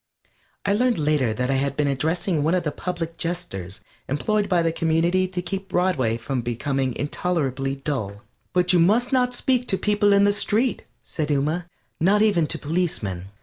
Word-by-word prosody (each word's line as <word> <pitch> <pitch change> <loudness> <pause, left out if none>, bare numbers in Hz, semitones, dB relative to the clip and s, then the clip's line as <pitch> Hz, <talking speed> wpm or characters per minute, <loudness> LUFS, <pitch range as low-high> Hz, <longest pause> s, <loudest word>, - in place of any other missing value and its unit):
I 200 - +2
learned 245 +2 +2
later 150 -6 +1
that 125 +4 -1
I 135 - +2
had 140 0 -1
been 150 -1 +2
addressing 160 +4 0
one 160 +5 +2
of 180 - 0
the 150 - -1
public 170 0 -4
jesters 110 - -4 0.3
employed 205 +9 0
by 175 -3 +3
the 165 - +2
community 165 +3 +1
to 180 -1 -4
keep 195 +1 -4
Broadway 145 -12 +1
from 125 +2 -3
becoming 130 +2 -2
intolerably 140 -4 -1
dull. 115 -8 -4 0.3
"But 180 0 +2
you 175 - +5
must 220 +10 +3
not 250 -1 +2
speak 250 -1 +1
to 190 - +1
people 205 0 +2
in 200 0 +5
the 205 0 +4
street," 225 +4 0 0.2
said 155 -3 -3
Ooma, 150 +4 0 0.3
"not 205 +5 +4
even 185 -8 +3
to - - -3
policemen." 145 - -2
165 Hz, 180 wpm, -23 LUFS, 135-190 Hz, 0.3 s, you